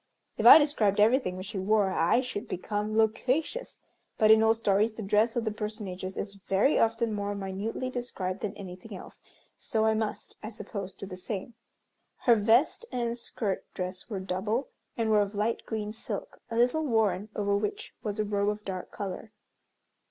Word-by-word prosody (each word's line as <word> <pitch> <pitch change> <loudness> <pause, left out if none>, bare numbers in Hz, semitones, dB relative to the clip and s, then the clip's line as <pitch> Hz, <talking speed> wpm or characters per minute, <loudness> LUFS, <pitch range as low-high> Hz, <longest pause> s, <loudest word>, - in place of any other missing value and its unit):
If - - +3
I - - +13
described 235 -10 +2
everything 215 -4 +3
which 185 - -6
she 205 -1 -5
wore 200 0 +2
I 185 +8 +3
should 250 -5 -5
become 210 +3 -2
loquacious, 255 - 0 0.4
but 215 0 +5
in 220 0 +7
old 225 0 +4
stories 215 0 +2
the 220 - -6
dress 210 +3 +2
of 240 -1 0
the 220 - 0
personages 205 -3 -5
is 200 0 -3
very 200 +9 +3
often 225 0 +1
more 205 0 -2
minutely 200 +6 -3
described 200 -7 -4
than 210 -1 -4
anything 190 +2 -8
else; - - -12 0.4
so 220 -1 0
I 220 - +4
must, 220 -1 -3
I 215 - -5
suppose, 205 -3 -6
do 195 - -9
the 185 -1 -8
same. 200 +4 -5 0.7
Her 240 - +6
vest 230 - +3
and 235 -1 -1
skirt 220 -4 -3
dress 185 +3 -5
were 205 -4 -3
double, 195 +7 -2 0.3
and 225 -2 +1
were 210 -1 +5
of 205 +1 -2
light 215 +3 -1
green 215 -1 -3
silk, 225 - -6
a 230 - -3
little 250 +7 +3
worn, 215 -4 +1
over 200 -1 +1
which 205 +1 -3
was 210 0 -4
a 215 - +1
robe 205 0 +1
of 210 0 -4
dark 185 -2 -5
color. 200 +2 -6
210 Hz, 180 wpm, -29 LUFS, 200-225 Hz, 0.7 s, I